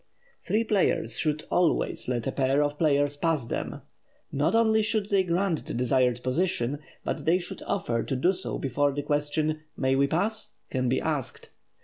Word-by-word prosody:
Three 220 Hz, +2 st, +1 dB
players 190 Hz, -, +1 dB
should 155 Hz, 0 st, 0 dB
always 175 Hz, -2 st, +1 dB
let 120 Hz, -2 st, -1 dB
a -, -, 0 dB
pair 135 Hz, +2 st, +2 dB
of 145 Hz, 0 st, -2 dB
players 145 Hz, -2 st, +2 dB
pass 155 Hz, -4 st, 0 dB
them. -, -, -4 dB, 0.5 s
Not 145 Hz, +9 st, +1 dB
only 220 Hz, -1 st, +4 dB
should 215 Hz, -1 st, 0 dB
they 200 Hz, -2 st, +4 dB
grant 180 Hz, -1 st, 0 dB
the -, -, -4 dB
desired 125 Hz, 0 st, +2 dB
position, 140 Hz, -2 st, 0 dB, 0.2 s
but -, -, -3 dB
they 170 Hz, +3 st, +4 dB
should 175 Hz, -, -7 dB
offer 120 Hz, -12 st, 0 dB
to 135 Hz, -, -2 dB
do 175 Hz, +9 st, +3 dB
so 185 Hz, 0 st, -4 dB
before 140 Hz, +1 st, +1 dB
the 145 Hz, +1 st, -3 dB
question, 150 Hz, +1 st, 0 dB, 0.2 s
"May 130 Hz, 0 st, +2 dB
we 140 Hz, +1 st, +3 dB
pass?" 210 Hz, +9 st, -1 dB, 0.2 s
can 130 Hz, -1 st, 0 dB
be 130 Hz, -, +2 dB
asked. 150 Hz, -5 st, -3 dB
145 Hz, 175 wpm, -27 LUFS, 135-180 Hz, 0.5 s, only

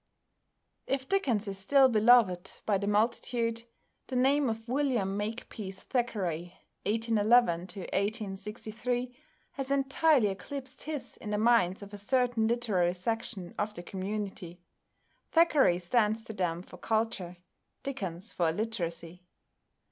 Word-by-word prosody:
If 270 Hz, -1 st, -1 dB
Dickens 245 Hz, -, +1 dB
is 195 Hz, -1 st, -4 dB
still 270 Hz, +7 st, +5 dB
beloved 215 Hz, -6 st, +4 dB
by 200 Hz, -3 st, +2 dB
the 200 Hz, -, -3 dB
multitude, 230 Hz, +2 st, 0 dB, 0.4 s
the 260 Hz, -, -5 dB
name 270 Hz, +2 st, +3 dB
of 225 Hz, +1 st, -4 dB
=William 245 Hz, -7 st, 0 dB
Makepeace 205 Hz, -2 st, -5 dB
Thackeray 185 Hz, -10 st, -2 dB, 0.3 s
(1811 220 Hz, -4 st, +3 dB
1863)= 215 Hz, +5 st, -3 dB, 0.4 s
has 270 Hz, -1 st, -4 dB
entirely 275 Hz, -3 st, +3 dB
eclipsed 260 Hz, +8 st, -6 dB
his 305 Hz, -2 st, -5 dB
in 210 Hz, -, -7 dB
the 210 Hz, -, 0 dB
minds 210 Hz, -4 st, +3 dB
of 200 Hz, +1 st, -11 dB
a 205 Hz, -, -6 dB
certain 245 Hz, 0 st, +2 dB
literary 210 Hz, -7 st, +1 dB
section 195 Hz, -2 st, -4 dB
of 210 Hz, +1 st, -1 dB
the 175 Hz, -, -7 dB
community. 190 Hz, -2 st, -5 dB, 0.7 s
Thackeray 305 Hz, -, +4 dB
stands 215 Hz, +4 st, +1 dB
to 220 Hz, -, -7 dB
them 175 Hz, -3 st, -1 dB
for 180 Hz, -, -13 dB
culture, 215 Hz, -4 st, -1 dB, 0.5 s
Dickens 195 Hz, -7 st, -5 dB
for 170 Hz, -2 st, +2 dB
illiteracy. 170 Hz, -3 st, -3 dB
215 Hz, 120 wpm, -30 LUFS, 190-245 Hz, 0.7 s, still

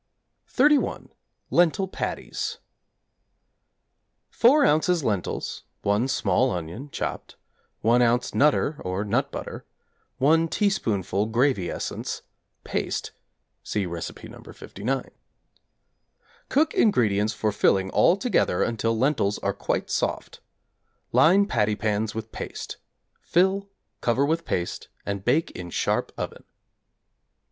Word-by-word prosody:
=31. 290 Hz, +2 st, +2 dB, 0.4 s
Lentil 175 Hz, +3 st, +3 dB
Patties= -, -, -4 dB, 1.7 s
4 280 Hz, +5 st, +5 dB
ozs. 160 Hz, -, +3 dB
lentils, 105 Hz, -7 st, -2 dB, 0.2 s
1 105 Hz, +5 st, +2 dB
small 130 Hz, -1 st, +2 dB
onion 90 Hz, -, -5 dB
(chopped), -, -, -5 dB, 0.5 s
1 120 Hz, +2 st, +4 dB
oz. 120 Hz, +1 st, +2 dB
'Nutter,' 150 Hz, +1 st, +2 dB
or 95 Hz, +3 st, -2 dB
nut 130 Hz, +7 st, 0 dB
butter, -, -, -6 dB, 0.5 s
1 160 Hz, +5 st, +4 dB
teaspoonful 110 Hz, -, 0 dB
gravy 115 Hz, -4 st, +1 dB
essence, -, -, -4 dB, 0.4 s
paste -, -, -3 dB, 0.5 s
(see 105 Hz, -2 st, -2 dB
Recipe 85 Hz, -2 st, -6 dB
No. -, -, -12 dB
59). 125 Hz, +6 st, -5 dB, 1.4 s
Cook 305 Hz, +3 st, +2 dB
ingredients 110 Hz, -, +2 dB
for 110 Hz, -1 st, 0 dB
filling 95 Hz, -2 st, +2 dB
all 180 Hz, -, +4 dB
together 215 Hz, -, +1 dB
until 115 Hz, -1 st, 0 dB
lentils 125 Hz, -5 st, +1 dB
are -, -, +1 dB
quite -, -, -2 dB
soft. -, -, -2 dB, 0.7 s
Line 190 Hz, +6 st, +5 dB
patty 105 Hz, -, +1 dB
pans 105 Hz, +1 st, -1 dB
with 110 Hz, 0 st, -5 dB
paste; -, -, -6 dB, 0.4 s
fill, 190 Hz, +3 st, +1 dB, 0.3 s
cover 125 Hz, +4 st, +2 dB
with 165 Hz, +3 st, 0 dB
paste 90 Hz, -1 st, -3 dB, 0.2 s
and 100 Hz, -1 st, -3 dB
bake 145 Hz, +9 st, +2 dB
in 90 Hz, -1 st, -7 dB
sharp -, -, 0 dB
oven. -, -, -5 dB
120 Hz, 110 wpm, -25 LUFS, 105-165 Hz, 1.7 s, 4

